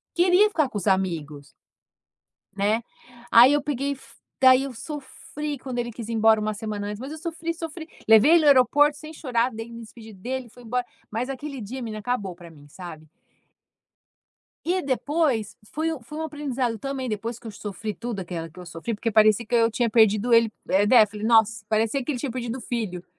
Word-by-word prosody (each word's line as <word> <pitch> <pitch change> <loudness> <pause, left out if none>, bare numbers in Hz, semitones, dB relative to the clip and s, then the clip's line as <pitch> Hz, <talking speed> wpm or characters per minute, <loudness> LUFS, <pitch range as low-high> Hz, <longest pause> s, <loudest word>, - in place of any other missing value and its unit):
queria 365 +4 +5
ficar 310 -8 +1
com 220 - -5
os 195 - -4
amigos. 160 -7 -1 1.1
Né? 210 +4 +1 0.5
Aí 245 +4 +8
eu 290 -1 +2
peguei 280 0 -2
e - - -3
fu 230 -3 -18 0.2
daí 260 0 +6
eu 270 -3 -6
sofri 290 +2 -6
quando 255 -2 -6
ele 240 0 -2
quis 230 -1 -8
ir - - -3
embora 220 0 +4
1 215 0 -1
semana 210 -1 -4
antes, 210 +1 -6
mas 270 +3 -6
eu - - -6
sofri, 335 0 -4
sofri, 330 0 -7 0.2
levei 225 +8 +7
ele 340 - +7
no 305 - +1
aeroporto 290 +2 +5
sem 310 0 -10
chorar, 250 -5 0
daí 225 0 -8
me 230 - -8
despedi 225 -1 -12
dele, 245 +5 -5
fui 245 +2 -16
embora. 245 +2 -1 0.3
Mas 235 +5 -3
aquele 275 0 -6
dia, 255 +6 -6
menina, 215 -2 -5
acabou 205 -5 -2
para 175 -1 -13
mim, 145 -3 -16
sabe? 155 -1 -10 1.6
E 365 +2 +1
depois 275 - 0 0.2
foi 320 +2 0
um 310 - -6
foi 300 +6 -9
um 320 - -2
aprendizado 270 -7 -2
também. 270 +2 -4
Depois 225 +2 -4
que 235 - -14
eu - - -5
sofri 210 +1 -6
tudo 230 -2 -5
aquela 170 -2 -5
que 170 - -17
eu 180 - -8
sofri, 170 +7 -5
porque 225 +2 -2
parecia 215 +1 +4
que 230 - -4
eu 230 -1 +4
tinha 235 +1 0
perdido 220 +1 +3
ele, 230 -1 +5 0.2
eh, 200 +2 +3
defi 210 -3 +4
Nossa! 225 -1 +3
Parecia 225 +5 +1
que 250 - -4
ele 250 - -4
tinha 265 +2 -3
perdido 240 -1 -4
o - - -9
filho. 210 -8 -4
235 Hz, 205 wpm, -24 LUFS, 215-275 Hz, 1.6 s, Aí